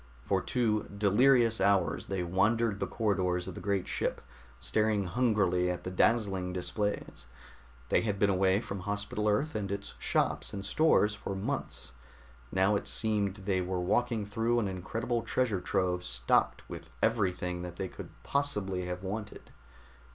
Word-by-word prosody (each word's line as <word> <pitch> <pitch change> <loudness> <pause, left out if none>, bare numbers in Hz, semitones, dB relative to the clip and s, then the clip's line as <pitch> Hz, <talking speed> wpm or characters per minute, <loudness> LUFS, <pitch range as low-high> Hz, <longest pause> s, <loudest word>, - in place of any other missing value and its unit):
For - - +1
two 110 -4 0
delirious 115 +3 +4
hours 95 -2 +2
they 95 -2 -2
wandered 105 +4 +1
the - - -1
corridors 95 -5 0
of 95 - -5
the - - -8
great 100 -2 -1
ship, - - -1 0.4
staring 105 - +1
hungrily 95 -4 +1
at 90 - -3
the 90 - -4
dazzling 95 -3 +1
displays. 95 - -3 0.6
They - - +3
had 105 -3 -1
been 100 0 +3
away 95 +1 +3
from 100 -4 -5
Hospital 105 +2 -1
Earth 140 +10 +1
and 100 -2 -3
its 100 - -4
shops - - 0
and 100 -1 -5
stores 130 -9 +3
for 100 -1 -5
months; 95 -8 -4 0.6
now 95 +2 +3
it - - -2
seemed 105 -3 0
they 95 -2 +1
were 90 0 -2
walking 110 +4 0
through 115 +4 0
an 105 - 0
incredible 115 +6 -2
treasure 115 -4 0
trove 90 0 0
stocked - - +1
with - - -9
everything 90 -5 0
that 90 -1 -6
they 95 +1 -3
could - - -9
possibly 105 -10 -1
have 90 +1 -5
wanted. 105 +2 -6
100 Hz, 155 wpm, -30 LUFS, 95-110 Hz, 0.6 s, delirious